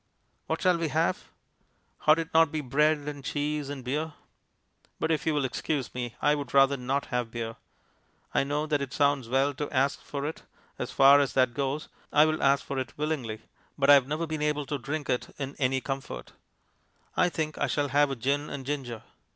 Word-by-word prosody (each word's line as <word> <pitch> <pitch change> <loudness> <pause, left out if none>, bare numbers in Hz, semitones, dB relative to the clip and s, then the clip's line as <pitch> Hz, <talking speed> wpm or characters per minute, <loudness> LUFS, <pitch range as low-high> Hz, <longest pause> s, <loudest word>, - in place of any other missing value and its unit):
What - - -2
shall 180 -2 +4
we 165 - 0
have? 160 +3 0 0.8
Ought 155 +1 +7
it 165 -1 -4
not 165 0 +7
to - - -14
be 155 +1 -2
bread 150 +4 +3
and 145 -2 -5
cheese 145 0 -2
and 140 -3 -6
beer? 150 +5 -2 0.9
But 160 - 0
if 155 -1 0
you 160 - +3
will 145 -2 +1
excuse 135 +1 -2
me, 120 -2 -4
I 145 - +3
would 140 -3 -4
rather 135 0 +6
not 135 +2 -1
have 125 -2 0
beer. 115 -1 -5 0.8
I - - +3
know 145 +2 -1
that 150 -2 0
it 135 -2 -4
sounds 140 -4 +2
well 135 +3 +2
to 145 +2 -4
ask 135 0 +1
for 140 -1 -5
it 155 - -4 0.4
as - - -3
far 140 +1 +7
as 140 -2 +1
that 130 -2 +3
goes, 140 +2 -2 0.2
I 150 - +6
will 155 0 0
ask 140 0 +3
for 135 - -3
it 130 - -5
willingly 135 -8 -3 0.3
but 140 0 +5
I - - +11
have 135 -2 +5
never 155 +3 -1
been 155 -1 -4
able 150 -1 0
to 145 +1 -3
drink 145 +3 -4
it 125 - -2
in 140 -1 -5
any 130 -1 +1
comfort. 135 0 -5 0.8
I 180 - +3
think 155 -2 -3
I - - +1
shall 145 -1 0
have 145 +1 +3
a 135 - -2
gin 140 +5 -1
and 135 -2 -6
ginger. 130 -5 -4
140 Hz, 210 wpm, -28 LUFS, 135-150 Hz, 0.9 s, I